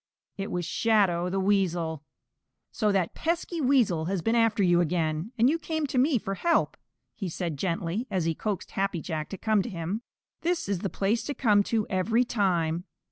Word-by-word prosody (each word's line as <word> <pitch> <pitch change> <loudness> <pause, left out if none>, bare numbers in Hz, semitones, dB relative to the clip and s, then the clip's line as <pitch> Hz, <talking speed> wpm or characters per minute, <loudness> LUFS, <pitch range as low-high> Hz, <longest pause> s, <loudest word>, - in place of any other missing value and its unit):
It 195 0 -4
was 175 -1 -2
Shadow 185 -3 +2
the 195 +1 -1
Weasel. 175 -6 0 0.7
"So 210 -1 +1
that 190 -4 0
pesky 335 0 -2
Weasel 240 - +3
has 185 -1 -2
been 225 - +1
after 225 -3 +3
you 175 -1 +4
again, 165 +2 -1
and 235 +2 +5
you 320 +5 +2
came 315 -1 -2
to 265 -2 0
me 270 +1 +3
for 195 -3 -3
help," 335 - +1 0.5
said 175 0 -3
he - - -5
gently, 170 - -2
as 185 -4 -1
he 165 - +1
coaxed 200 +2 -4
Happy 195 -3 -1
Jack 155 -2 -4
to 195 - -6
come 215 +1 +2
to 240 - -5
him. 180 +3 -3 0.4
"This 345 - 0
is 200 -3 -1
the 195 - -2
place 205 +6 0
to 285 - -3
come 210 -5 +4
to 220 -2 0
every 215 +5 +2
time. 180 -7 0
195 Hz, 190 wpm, -27 LUFS, 175-230 Hz, 0.7 s, and